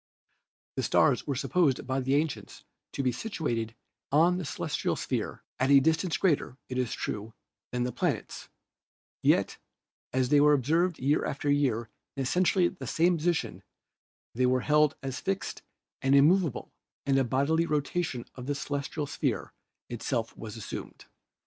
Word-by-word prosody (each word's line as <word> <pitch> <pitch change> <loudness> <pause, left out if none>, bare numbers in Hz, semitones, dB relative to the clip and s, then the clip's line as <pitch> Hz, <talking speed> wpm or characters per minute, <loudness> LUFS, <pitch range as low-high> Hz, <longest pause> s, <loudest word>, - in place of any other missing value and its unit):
The - - +1
stars - - +3
were 140 - 0
supposed 140 +1 +1
by 130 +1 -1
the 135 +1 +1
ancients 150 0 -2 0.3
to 140 - -2
be 130 - +2
situated 120 - -3 0.4
on 170 +5 +4
the 180 - -4
celestial 135 - -2
sphere - - -3 0.2
at 130 - +2
a 140 -1 +8
distance 160 +4 +1
greater, 150 -7 +1
it 130 0 -2
is 125 -3 -1
true, 110 +2 -4 0.4
than 125 0 -1
the 125 - -1
planets; - - -3 0.7
yet - - +2 0.5
as 130 -1 +1
they 145 0 +5
were 150 0 +6
observed 160 +6 +2
year 140 +4 +1
after 145 +1 -1
year 125 -6 +1 0.3
in 135 - 0
essentially 180 +5 +3
the 185 - -7
same 175 +2 +3
positions 170 +1 -1 0.7
they 125 +2 +2
were 130 0 +2
held 150 0 +3
as 135 -1 -4
fixed 195 0 -3 0.4
and 135 +1 +3
immovable 160 +1 +3 0.3
and 135 -1 +3
a - - +3
bodily 140 +7 +1
rotation 150 -3 -1
of 125 0 -9
the 145 - 0
celestial 145 +1 -3
sphere 140 - -2 0.3
itself 120 0 -3
was 110 -1 -8
assumed. 110 - -7
140 Hz, 155 wpm, -29 LUFS, 125-160 Hz, 0.7 s, a